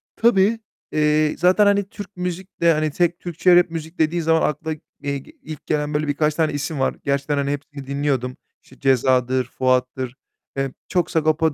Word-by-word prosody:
Tabii, 225 -1 +3 0.3
eee, 150 0 +2
zaten, 185 +4 +4
hani, 200 0 +3
Türk 205 -2 -10
müzik 180 +1 -5
de, 170 -1 +5
hani, 155 0 0
tek 170 +2 0
Türkçe 175 +1 +3
rap 175 0 +5
müzik 160 +1 -7
dediğin 165 +2 +2
zaman 160 0 +3
akla, 160 +2 -4 0.3
eee, 140 0 -1 0.3
ilk 155 -2 -9
gelen 150 -1 -1
böyle 150 +1 0
birkaç 150 +1 +1
tane 160 -2 +1
isim 145 0 -3
var. 130 - +1
Gerçekten, 140 +1 0
hani, 140 0 0
hepsini 145 -1 -6
dinliyordum. 140 -3 -1 0.3
İşte, 130 - -19
Ceza'dır, 130 -1 +2
Fuat'tır. 130 0 -1 0.4
Eee, 135 -1 -1 0.2
çok 180 -3 0
Sagopa 160 0 +2
155 Hz, 170 wpm, -22 LUFS, 140-170 Hz, 0.4 s, de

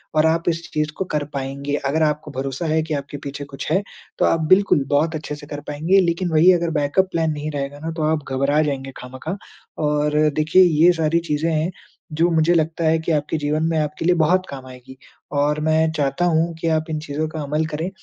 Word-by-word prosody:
और 155 0 +4
आप 165 +1 +2
इस 165 0 -3
चीज़ 150 0 0
को 190 - -2
कर 150 -4 -2
पाएँगे। 140 +1 -3
अगर 155 +4 +1
आपको 150 -1 -1
भरोसा 135 +3 -4
है 160 0 +2
कि 160 -1 -4
आपके 140 0 -4
पीछे 140 0 -7
कुछ 135 - -6
है 190 - +3 0.4
तो - - +4
आप 165 - +2
बिल्कुल 185 -7 +4
बहुत 155 +3 +1
अच्छे 150 -1 -5
से 145 0 -12
कर 145 -1 -6
पाएँगे। 160 +7 +2
लेकिन 175 0 0
वही 160 +4 +6
अगर 170 -1 0
बैकअप 150 +6 +1
प्लान 160 -1 0
नहीं 150 +1 -4
रहेगा 140 0 -4
ना 160 +2 -4
तो 155 - -1
आप 155 -1 +1
घबरा 140 +3 +2
जाएँगे 135 -2 -3
ख़ाहमख़ाह। 130 +8 -6 0.5
और 150 0 +1 0.2
देखिए 155 +5 +5
ये 170 0 +5
सारी 165 0 +1
चीज़े 150 +2 0
हैं 160 +3 0 0.5
जो 175 - +5
मुझे 160 +1 +3
लगता 165 0 0
है 160 0 +3
कि 160 +1 -2
आपके 150 +1 0
जीवन 150 +1 -1
में 165 - 0
आपके 150 +1 -3
लिए 180 - +4
बहुत 180 +3 +2
काम 135 -2 -8
आएगी। 130 +1 -12 0.4
और 150 +1 +1
मैं 160 +1 +2
चाहता 145 +2 0
हूँ 165 0 +1
कि 165 - -1
आप 160 - -9
इन 155 -1 -2
चीज़ों 150 +2 -2
का 155 -1 -5
अमल 150 +3 -1
करें। 160 +4 -2
155 Hz, 225 wpm, -21 LUFS, 145-165 Hz, 0.5 s, वही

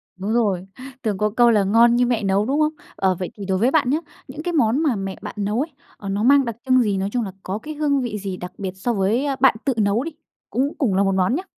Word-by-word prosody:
Đúng 195 +4 -3
rồi. 195 -6 +1 0.4
Thường 210 -4 -1
có 210 +1 +1
câu 240 +2 +4
là 210 -3 +4
ngon 230 +4 +5
như 245 0 +3
mẹ 235 -3 0
nấu, 195 +2 +2
đúng 280 +4 0
không? 305 +1 +2 0.2
Ờ, 190 -1 +1
vậy 185 - -4
thì 200 - -6
đối 190 -1 0
với 240 +7 +2
bạn 290 -6 +2
nhá, 290 - +2 0.3
những 305 - -8
cái 350 0 -2
món 260 +1 +2
mà 275 -8 +2
mẹ 195 -1 -4
bạn 210 - -7
nấu 210 +3 -1
ấy, 310 +1 -4 0.3
ờ, 200 - -7
nó 200 +2 -1
mang 275 +1 +5
đặc 230 -2 -4
trưng 255 -1 +4
gì? 205 -4 0
Nói 195 +1 -1
chung 245 0 0
là 195 - -5
có 190 +2 -3
cái 305 +7 -7
hương 290 -2 +1
vị 230 -4 -3
gì 195 -2 -5
đặc 180 +1 -7
biệt 190 -2 -4
so 240 +5 -1
với 220 +8 +1
bạn 260 -2 +5
tự 270 - +2
nấu 210 +4 +2
đi, 330 - -5 0.4
cũng 270 +6 0
cùng 220 -10 +1
là 200 - +3
một 195 -1 +1
món 190 +7 +2
nhá? 360 - -3
220 Hz, 285 wpm, -22 LUFS, 195-260 Hz, 0.4 s, ngon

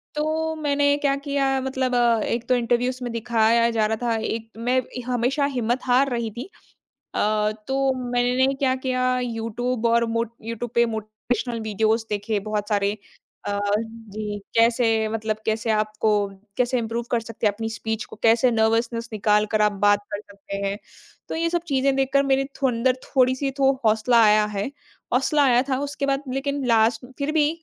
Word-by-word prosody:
तो 315 +1 -1
मैंने 285 -2 +2
क्या 280 -1 +1
किया 280 -1 +1
मतलब 260 -1 -1
अ, 235 -2 +3
एक 235 0 -2
तो 255 - +5
इन्टर्व्यूज़ 245 +1 0
में 240 - -3
दिखाया 230 0 +2
जा 220 -2 +1
रहा 220 +1 0
था, 230 - +1
एक 225 0 -4
मैं 250 +3 +1 0.3
हमेशा 250 +3 +1
हिम्मत 240 +2 0
हार 260 +2 +3
रही 235 -3 -2
थी। 245 - -8 0.7
अ, 210 0 +1 0.2
तो 270 0 +1 0.2
मैंने 250 +2 +2
क्या 265 -1 +1
किया 255 -1 0
यूट्यूब 235 +1 -3
और 235 0 +3
मोट 230 0 -1
यूट्यूब 230 +1 -5
पे 235 0 +5
मोटिवेशनल 220 +2 -3
वीडियोज़ 220 +1 0
देखें 210 0 -1
बहुत 210 -1 -3
सारे। 200 -1 +1 0.6
अ, 205 0 -1 0.2
जी, 215 -2 -7 0.2
कैसे, 230 -1 +3
मतलब 220 -1 -2
कैसे 220 +1 -1
आपको 215 0 0 0.5
कैसे 250 0 +1
इम्प्रूव 230 +1 -3
कर 235 - +2
सकते 225 -1 -2
हैं 205 - +1
अपनी 225 +2 -4
स्पीच 220 0 -4
को, - - -12
कैसे 235 +2 +4
नर्वसनेस 230 +1 +1
निकाल 210 0 +2
कर 215 -1 +2
आप 210 0 +4
बात 205 0 +5
कर 205 - -3
सकते 200 -1 -9
हैं। 200 +1 -2 0.5
तो - - -3
ये 335 +1 0
सब 345 0 0
चीज़ें 275 -1 +2
देखकर 270 +1 +2
मेरे 270 0 +2 0.2
अंदर 255 -1 +2
थोड़ी-सी 260 +1 +1
तो 270 0 +5
हौसला 225 +2 +4
आया 210 0 +5
है। 205 -1 -3 0.5
हौसला 280 +3 +3
आया 245 -2 +4
था, 260 - +1
उसके 285 0 -3
बाद 275 0 0
लेकिन 280 +1 -2
लास्ट 225 +1 +3
फिर 285 +1 -1
भी 305 -2 +3
235 Hz, 175 wpm, -23 LUFS, 220-260 Hz, 0.7 s, तो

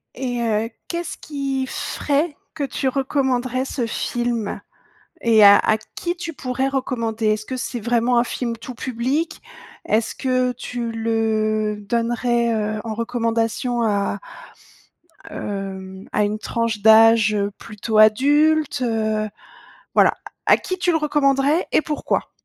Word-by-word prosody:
Et 245 -2 -3
heu, 225 -1 0 0.2
qu'est-ce 340 0 -4
qui 275 -3 -3
ferait 290 +4 -1 0.2
que 300 - -3
tu 275 0 -2
recommanderais 260 -1 0
ce 255 -2 -2
film? 235 -1 -2 0.6
Et 225 -2 +5
à 200 0 +9
à 220 - +2 0.2
qui 345 0 -2
tu 340 -1 -5
pourrais 260 -1 -2
recommander? 235 -5 -2
Est-ce 215 0 0
que 260 - -4
c'est 245 -1 -4
vraiment 240 +2 +2
un - - +3
film 235 -1 -3
tout 245 +2 -9
public? 265 +7 -2 0.4
Est-ce 220 +1 +1
que 255 -1 +1
tu 240 -1 -5
le 220 -1 0
donnerais, 235 +2 0
heu, 215 0 -2
en 225 -2 -4
recommandation 230 +1 -1
à, 205 -2 0 1.1
hem, 190 -5 -6
à 210 - +2
une 210 +1 -1
tranche 230 -2 -2
d'âge, 220 0 +6
heu, 200 -1 0
plutôt 215 +1 -3
adulte, 290 +7 +4
heu, 220 -2 0 0.7
voilà, - - +6 0.2
à - - +1
à - - +6
qui 370 - -4
tu 355 - +1
le 325 - +2
recommanderais 295 +1 +2
et - - +4
pourquoi? 300 -1 -2
235 Hz, 140 wpm, -21 LUFS, 220-265 Hz, 1.1 s, à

